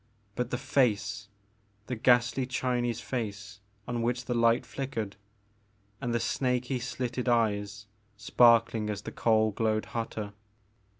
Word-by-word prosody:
But 125 Hz, +2 st, -2 dB
the 125 Hz, -, -1 dB
face! 110 Hz, -5 st, 0 dB, 0.3 s
— 105 Hz, -1 st, -39 dB
the 125 Hz, -, -3 dB
ghastly 125 Hz, +2 st, +3 dB
Chinese 125 Hz, -2 st, -1 dB
face 110 Hz, -3 st, -5 dB, 0.3 s
on 120 Hz, -1 st, -2 dB
which 120 Hz, +1 st, -1 dB
the 125 Hz, -, -1 dB
light 115 Hz, 0 st, +3 dB
flickered, 120 Hz, -7 st, -4 dB, 0.4 s
— 105 Hz, 0 st, -38 dB
and 120 Hz, -3 st, -2 dB
the 120 Hz, -, +1 dB
snaky 125 Hz, +1 st, 0 dB
slitted 125 Hz, 0 st, -3 dB
eyes, 105 Hz, -3 st, 0 dB, 0.3 s
sparkling 115 Hz, +1 st, +4 dB
as 100 Hz, -1 st, -4 dB
the -, -, -6 dB
coal 110 Hz, -1 st, +2 dB
glowed 110 Hz, +1 st, 0 dB
hotter. 110 Hz, -3 st, -4 dB
115 Hz, 135 wpm, -29 LUFS, 105-125 Hz, 0.4 s, sparkling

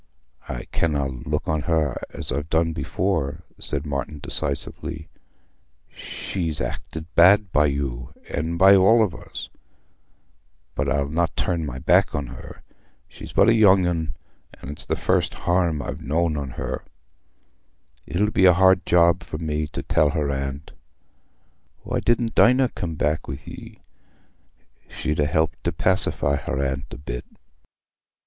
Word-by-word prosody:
"I -, -, -4 dB
canna 75 Hz, -4 st, 0 dB
look 65 Hz, -2 st, -4 dB
on 80 Hz, -1 st, 0 dB
her 75 Hz, -3 st, 0 dB
as -, -, -6 dB
I've 75 Hz, +4 st, -3 dB
done 80 Hz, +1 st, +1 dB
before," 80 Hz, -6 st, -2 dB, 0.2 s
said 70 Hz, 0 st, -1 dB
Martin 70 Hz, +1 st, -3 dB
decisively. 75 Hz, +2 st, -3 dB, 0.8 s
"She's 80 Hz, -5 st, -3 dB
acted 80 Hz, -1 st, -5 dB
bad 95 Hz, +3 st, +6 dB
by 75 Hz, -1 st, +4 dB
you, 70 Hz, -4 st, -3 dB, 0.2 s
and 80 Hz, +3 st, -3 dB
by 95 Hz, +2 st, +8 dB
all 110 Hz, +4 st, +6 dB
of 100 Hz, -6 st, -1 dB
us. -, -, -8 dB, 1.2 s
But 75 Hz, -, -1 dB
I'll 70 Hz, -1 st, +1 dB
not 80 Hz, +2 st, -1 dB
turn 85 Hz, -4 st, -1 dB
my 65 Hz, -, -5 dB
back 65 Hz, -, +3 dB
on 75 Hz, -1 st, -2 dB
her: -, -, -11 dB, 0.4 s
she's -, -, -11 dB
but 100 Hz, -, +4 dB
a 115 Hz, -, +6 dB
young 100 Hz, -4 st, +5 dB
un, 80 Hz, -5 st, -2 dB, 0.4 s
and 70 Hz, -, -9 dB
it's 75 Hz, -, -7 dB
the -, -, 0 dB
first -, -, 0 dB
harm 85 Hz, -4 st, 0 dB
I've -, -, -6 dB
knowed 80 Hz, +2 st, 0 dB
on 70 Hz, -2 st, -3 dB
her. -, -, -5 dB, 1.2 s
It'll 105 Hz, +5 st, 0 dB
be 95 Hz, -, +3 dB
a 90 Hz, -, +8 dB
hard 95 Hz, +1 st, +4 dB
job 85 Hz, 0 st, +4 dB
for 85 Hz, -3 st, -6 dB
me 75 Hz, -1 st, -2 dB
to -, -, -6 dB
tell 75 Hz, -, +2 dB
her 75 Hz, -1 st, -1 dB
aunt. 70 Hz, +2 st, -4 dB, 1.1 s
Why -, -, -2 dB
didna 120 Hz, 0 st, +1 dB
Dinah 125 Hz, +2 st, +4 dB
come 85 Hz, -8 st, -5 dB
back 75 Hz, +1 st, -1 dB
wi' 65 Hz, -, -4 dB
ye? -, -, -11 dB, 1.1 s
She'd 75 Hz, 0 st, -3 dB
ha' 75 Hz, 0 st, +2 dB
helped 80 Hz, +3 st, 0 dB
to -, -, 0 dB
pacify 75 Hz, -6 st, +1 dB
her 65 Hz, -, -3 dB
aunt 65 Hz, -1 st, -1 dB
a -, -, -7 dB
bit." -, -, -6 dB
80 Hz, 150 wpm, -23 LUFS, 70-90 Hz, 1.2 s, by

